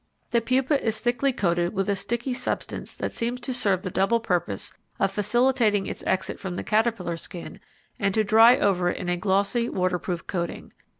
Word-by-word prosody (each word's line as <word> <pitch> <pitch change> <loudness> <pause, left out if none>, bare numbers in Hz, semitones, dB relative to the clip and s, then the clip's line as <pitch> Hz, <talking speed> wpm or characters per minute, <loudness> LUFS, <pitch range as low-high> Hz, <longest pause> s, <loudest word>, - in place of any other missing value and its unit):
The 235 - +3
pupa 260 +4 +1
is 220 -1 0
thickly 245 +4 +1
coated 175 -7 0
with 195 0 0
a 200 - +1
sticky 235 +6 -2
substance 250 0 -3
that - - -3
seems 240 +2 -2
to 255 +2 -3
serve 200 -7 +1
the 185 - -4
double 195 +6 +2
purpose 175 - -2 0.3
of 195 - +2
facilitating 215 0 +2
its - - -6
exit 190 - -1
from 190 -3 -5
the - - -4
caterpillar 215 -6 0
skin 170 +1 -8 0.4
and 200 -1 +1
to 220 - +3
dry 225 +4 +7
over 180 -5 +2
it - - -2
in 175 - -4
a 175 - +1
glossy 200 +5 +1
waterproof 180 -1 -1
coating. 170 -3 -4
205 Hz, 185 wpm, -25 LUFS, 185-235 Hz, 0.4 s, dry